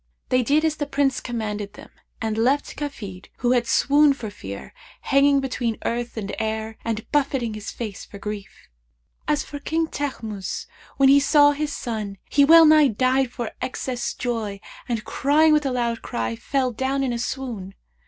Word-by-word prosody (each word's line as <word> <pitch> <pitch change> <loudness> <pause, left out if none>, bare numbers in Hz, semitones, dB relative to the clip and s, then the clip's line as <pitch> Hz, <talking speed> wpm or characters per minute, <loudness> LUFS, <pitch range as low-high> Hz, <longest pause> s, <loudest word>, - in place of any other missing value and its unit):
They 255 -1 +3
did 295 +6 +2
as 310 -1 0
the 290 - -2
Prince 280 -2 +1
commanded 210 -4 -4
them - - -13 0.3
and 220 -1 -2
left 260 +6 +1
Kafid, 205 -11 -6
who 245 -1 +1
had 240 -2 +2
swooned 285 0 +4
for 220 -5 -6
fear, 100 - -8 0.3
hanging 275 +1 +4
between 245 -4 -2
earth 235 0 -2
and 200 -2 -4
air 220 0 -3
and 225 -1 -3
buffeting 270 -6 +1
his 215 -1 -6
face 215 -5 -6
for 200 - -11
grief. 210 0 -7 0.6
As 300 -1 +1
for 290 - -8
King 325 +3 0
Teghmus, 225 -10 -4 0.3
when 275 - +5
he 280 +1 +7
saw 290 0 +5
his 295 +1 -2
son, 215 -7 -4
he 285 - +5
well 325 +3 +8
nigh 305 -1 +7
died 255 +2 +1
for 240 -2 -4
excess 255 -1 -3
of - - -22
joy 225 -5 -3 0.3
and, 230 -2 -2
crying 305 +3 +3
with 300 -2 +2
a - - -1
loud 235 -2 -1
cry, 115 0 -3
fell 260 - -1
down 265 +3 -1
in 255 -2 0
a 235 - -3
swoon. 235 -7 -4
250 Hz, 180 wpm, -23 LUFS, 220-280 Hz, 0.6 s, well